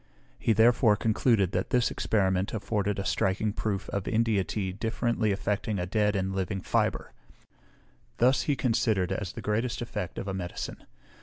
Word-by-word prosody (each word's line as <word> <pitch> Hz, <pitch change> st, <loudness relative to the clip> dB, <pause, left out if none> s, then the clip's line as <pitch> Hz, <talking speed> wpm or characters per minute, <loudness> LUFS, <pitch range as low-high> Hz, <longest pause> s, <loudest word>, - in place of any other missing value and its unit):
He -, -, +1 dB
therefore 115 Hz, 0 st, +5 dB
concluded, 110 Hz, -2 st, +2 dB
that -, -, -1 dB
this 125 Hz, -1 st, +2 dB
experiment 95 Hz, -1 st, 0 dB
afforded 105 Hz, -2 st, -1 dB
a 100 Hz, -, -3 dB
striking 100 Hz, +3 st, 0 dB
proof 100 Hz, -3 st, -2 dB
of 100 Hz, -2 st, -3 dB
India 110 Hz, -3 st, +2 dB
tea 95 Hz, -1 st, -3 dB
differently 110 Hz, +2 st, -1 dB
affecting 100 Hz, +1 st, -1 dB
a 90 Hz, -, -1 dB
dead 105 Hz, +2 st, +1 dB
and 95 Hz, 0 st, -1 dB
a -, -, -5 dB
living 95 Hz, +1 st, -2 dB
fibre; -, -, -1 dB, 1.0 s
this 125 Hz, +2 st, +4 dB
he 145 Hz, -, +3 dB
considered 110 Hz, -7 st, +1 dB
as 95 Hz, -1 st, -3 dB
the -, -, -8 dB
greatest 115 Hz, +3 st, 0 dB
effect 90 Hz, -7 st, -5 dB
of -, -, -4 dB
a 95 Hz, -, -2 dB
medicine. 90 Hz, -2 st, -5 dB
105 Hz, 165 wpm, -28 LUFS, 95-115 Hz, 1.0 s, therefore